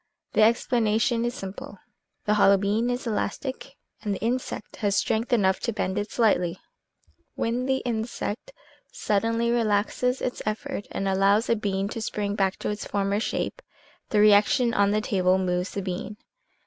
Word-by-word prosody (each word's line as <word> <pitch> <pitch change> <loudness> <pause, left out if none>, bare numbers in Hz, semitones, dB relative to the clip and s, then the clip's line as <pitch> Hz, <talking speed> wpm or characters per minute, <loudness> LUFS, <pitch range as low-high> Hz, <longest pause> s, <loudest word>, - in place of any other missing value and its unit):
The - - +3
explanation 230 0 +2
is 240 - -2
simple. 195 +1 -8 0.5
The 210 - +2
hollow 200 -1 +5
bean 210 +5 0
is 245 +1 -2
elastic 260 +5 -3 0.3
and 205 -2 -2
the - - -7
insect 240 0 -3
has 200 -2 0
strength 220 +5 0
enough 190 -5 +3
to 230 - -2
bend 190 -3 -2
it 205 +1 -4
slightly; 180 -7 +1 0.8
when 245 +3 -1
the 265 0 0
insect 230 - -3 0.4
suddenly 230 +3 0
relaxes 235 +3 +1
its 250 - -3
effort 215 +1 -4
and 195 - -3
allows 195 +3 +3
the 230 - +2
bean 200 -2 -1
to 225 - -5
spring 205 -1 -2
back 195 -2 +1
to - - -3
its 210 - -4
former 200 0 -1
shape, 375 - -3 0.5
the 210 - +2
reaction 215 +4 +5
on 200 -1 +3
the 210 +1 +1
table 185 -3 +2
moves 180 -1 -1
the 200 - -4
bean. 190 +3 -5
210 Hz, 160 wpm, -26 LUFS, 200-235 Hz, 0.8 s, hollow